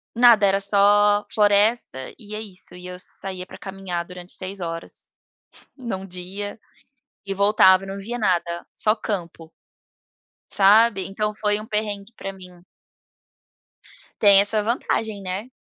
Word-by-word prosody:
nada 235 -3 +6
era 195 0 +2
só 205 +1 +4
floresta 205 - +2
e 210 0 -9
é 215 - -5
isso 195 -4 -9
e 180 0 -10
eu 180 0 -7
saía 185 0 -7
para - - -11
caminhar 190 -3 -5
durante 180 0 -10
6 190 +1 -6
horas, 165 -1 -7 0.7
em 240 -5 -4
1 190 0 -6
dia, 190 +3 -7 0.7
e 195 - -2
voltava 195 -1 +5
e - - -10
não 195 +1 -5
via 230 +5 -5
nada, 175 -5 -1
só 215 - +1
campo. 170 -6 -5 1.0
Sabe, 205 0 +5
então 210 +2 -2
foi 210 0 0
um 215 - -9
perrengue 210 -1 -3
para 195 - -6
mim. 180 -2 -15 1.6
Tem 200 -2 +7
essa 205 +1 +1
vantagem, 220 -2 -2
né, 190 +5 -4
200 Hz, 140 wpm, -23 LUFS, 185-210 Hz, 1.6 s, Tem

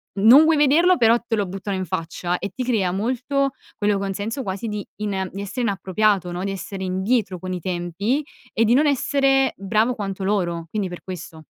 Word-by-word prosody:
non 230 +10 +8
vuoi 320 -1 +4
vederlo, 325 +5 +5
però 230 0 +5
te 230 - 0
lo 205 -3 -1
buttano 195 +1 -4
in 185 0 -2
faccia, 175 +2 -3
e 200 - -4
ti 255 - -3
crea 215 -8 +1
molto 255 +7 0 0.3
quello 205 -1 +2
con 195 0 -2
senso 225 +7 -4
quasi 195 +3 -4
di 210 -2 -4
ina 195 -3 -2
di 195 - -6
essere 210 +6 -4
inappropriato 195 -2 +1
no, 180 +2 -4
di 195 - -2
essere 190 +1 -6
indietro 190 +1 0
con 185 +1 -5
i 180 - -3
tempi 185 - -2 0.3
e 225 - +2
di 230 +2 +4
non 300 +3 +4
essere 275 -1 +2
bravo 215 +5 +1
quanto 195 -2 -4
loro, 175 -4 -1
quindi 205 -3 -2
per 175 - -8
questo. 165 -4 -9
200 Hz, 200 wpm, -22 LUFS, 185-240 Hz, 0.3 s, non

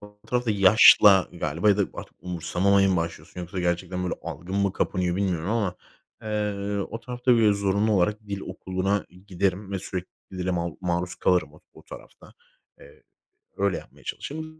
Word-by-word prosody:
o 105 0 -15
tarafta 125 -2 0
yaşla 100 -1 +7
galiba 85 +2 -1
ya 100 - +5
da 105 - +2
artık - - -9
umursamamaya 90 +3 +1
mı 95 - +2
başlıyorsun 85 +1 -5
yoksa 90 +1 -5
gerçekten, 90 +1 -2
böyle, 90 - -1
algın 90 +3 -6
mı 100 -1 +1
kapanıyor 90 -1 -1
bilmiyorum 95 -2 -1
ama, 105 -6 0 0.5
eee, 105 -2 -2
o 115 - -6
tarafta, 125 +1 0
böyle, 110 -3 +5
zorunlu 100 +2 +1
olarak 105 +2 +1
dil 100 -1 -4
okuluna 95 +1 -2 0.2
giderim 95 +1 -1
ve 95 - -1
sürekli 95 -1 -5 0.3
dile 90 0 -1
mal 85 -3 -2
maruz 90 0 -2
kalırım 90 -1 +1
o - - -18
o - - -15
tarafta. - - -14 0.5
Eee, 480 -2 -17 0.6
öyle - - +1
yapmaya - - -13
çalışırım. 155 +1 -6
95 Hz, 165 wpm, -25 LUFS, 90-105 Hz, 0.6 s, yaşla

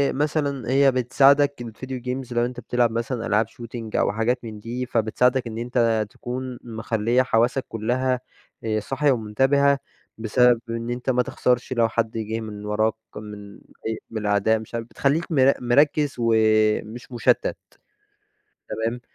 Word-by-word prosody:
مثلًا 145 -3 -1
هي 135 0 +5
بتساعدك 135 +2 +3
ال 115 -2 -7
video 130 -1 -6
games 125 -1 -4
لو 120 0 +2
أنت 125 0 -6
بتلعب 120 -1 +1
مثلًا 115 +1 -3
ألعاب 105 +1 +2
shooting، 115 -1 -8
أو - - +2
حاجات 115 +4 0
من 110 -2 -7
دي، 120 +4 -4
فبتساعدك 125 +2 +1
إن 110 0 -6
أنت 115 -2 +1
تكون 125 +2 -6
مخليَّة 115 +1 0
حواسك 125 +3 +1
كلها 125 +3 0 0.4
آآ، 110 -1 0
صاحية 135 +6 +1
ومُنتبهة، 135 +5 +2 0.4
بسبب 120 +2 +3
إن 115 +1 -3
أنت 125 +2 -3
ما 125 -1 +3
تخسرش 125 +1 0
لو 115 -2 +2
حد 115 0 -1
جِه 110 +1 -3
من 105 -1 -7
وراك، 110 +1 +1 0.2
من 105 -1 -9 0.3
أي 110 - -2
من 110 -2 -4
الأعداء 105 +2 +2
مش 110 +1 -9
عارف 115 -1 -3
بتخلِّيك 155 +8 0
مر 135 -2 +5
مركز 145 +3 +3
ومش 110 +1 +2
مُشَتّت، 120 -2 +1 1.1
تمام؟ 115 +2 -2
120 Hz, 150 wpm, -23 LUFS, 110-130 Hz, 1.1 s, هي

